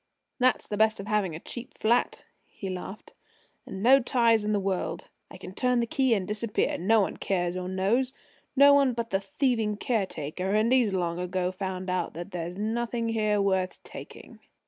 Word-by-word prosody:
"That's 255 0 +2
the 205 - -4
best 220 0 +3
of 200 - -6
having 205 -6 0
a - - -6
cheap 240 +7 -9
flat," 235 +3 +1 0.2
he 195 -2 -7
laughed, 185 +3 -8 0.5
"and 190 +1 -6
no 265 +3 +7
ties 235 -3 +2
in 210 - -1
the 205 - +2
world. 195 -1 -3 0.2
I - - -11
can 185 - -10
turn 250 +3 +1
the 235 - +1
key 265 -2 +2
and 190 -3 -2
disappear. 210 +1 -1
No 215 +5 +4
one 195 - -2
cares 175 -2 -1
or 185 0 -4
knows 210 +8 +1 0.4
no 280 +1 +7
one 275 -3 +4
but 230 0 -4
the 195 - +2
thieving 220 0 -1
caretaker. 190 - -2
And 220 +3 +3
he's 245 -5 +3
long 175 -1 -1
ago 180 0 -1
found 185 0 -5
out 185 -3 -2
that 175 +4 -7
there's 175 0 -5
nothing 230 +2 -2
here 215 -2 +1
worth 190 -2 0
taking!" - - -11
210 Hz, 190 wpm, -27 LUFS, 185-235 Hz, 0.5 s, no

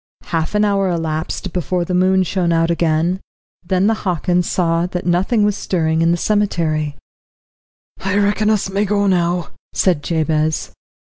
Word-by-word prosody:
Half 165 +3 -2
an 210 0 +3
hour 200 -1 +1
elapsed 165 +1 -3
before 180 +1 -1
the 180 - -3
moon 185 +1 +3
shone 180 -1 0
out 165 0 +2
again. 170 +2 +1 0.4
Then 185 +2 +1
the 220 - +3
Hockins 180 -1 0
saw 170 -1 +1
that 180 -1 -5
nothing 185 +6 +2
was 205 -1 +2
stirring 160 -5 0
in 165 - +3
the 170 - +2
cemetery. 165 -8 0 1.1
"I 195 +1 0
reckon 205 +1 +2
us 215 -3 +1
may 195 +2 0
go 205 0 +1
now," 175 -2 +1 0.2
said 175 -6 +2
Jabez. 155 0 -1
180 Hz, 155 wpm, -18 LUFS, 165-195 Hz, 1.1 s, an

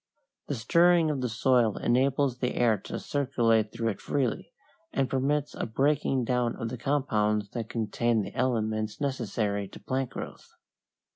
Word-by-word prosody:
The 145 - -2
stirring 170 +6 +4
of 140 -3 -2
the 125 - -1
soil 115 -1 +2
enables 130 +1 +1
the 125 -1 -1
air 120 -3 +3
to - - -4
circulate 115 -6 +1
through 115 +1 -1
it 100 - -5
freely, 135 -5 -1 0.4
and 135 -1 +1
permits 140 +3 0
a - - -3
breaking 135 +2 +1
down 125 -1 0
of 115 - -4
the 125 - -5
compounds 105 -7 0
that 115 -3 -5
contain 115 0 0
the 95 - -8
elements 110 -4 -1
necessary 110 -7 -1
to - - -12
plant 130 -1 -2
growth. - - -9
125 Hz, 155 wpm, -28 LUFS, 110-135 Hz, 0.4 s, stirring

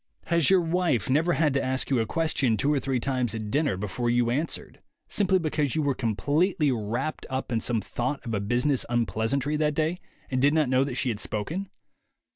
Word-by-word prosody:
Has 170 -3 +2
your 190 -1 +5
wife 165 - 0
never 165 +5 +3
had 150 -3 +2
to 140 - +1
ask 130 +1 -1
you 130 - +3
a 110 - 0
question 140 -8 +1
two 140 +8 +2
or 145 - +2
three 130 -1 -1
times 125 -3 -1
at 110 -2 -5
dinner 145 -9 +1
before 105 +5 -2
you 120 0 +2
answered, 150 +7 -3 0.3
simply 190 -2 +2
because 155 -5 -1
you 155 - +1
were 140 -1 +1
completely 145 - +1
wrapped 120 +6 -3
up 130 -1 -3
in 115 -2 0
some 115 -2 0
thought 120 +9 -3
of 115 - -4
a 105 - 0
business 120 +6 +1
unpleasantry 120 +5 0
that 150 -1 +1
day, 160 +4 0 0.3
and 130 -1 +1
did 145 +3 +4
not 155 -5 +2
know 130 +1 +3
that 135 -3 -4
she 130 - 0
had 110 -3 -2
spoken? 165 - -3
135 Hz, 210 wpm, -26 LUFS, 120-155 Hz, 0.3 s, your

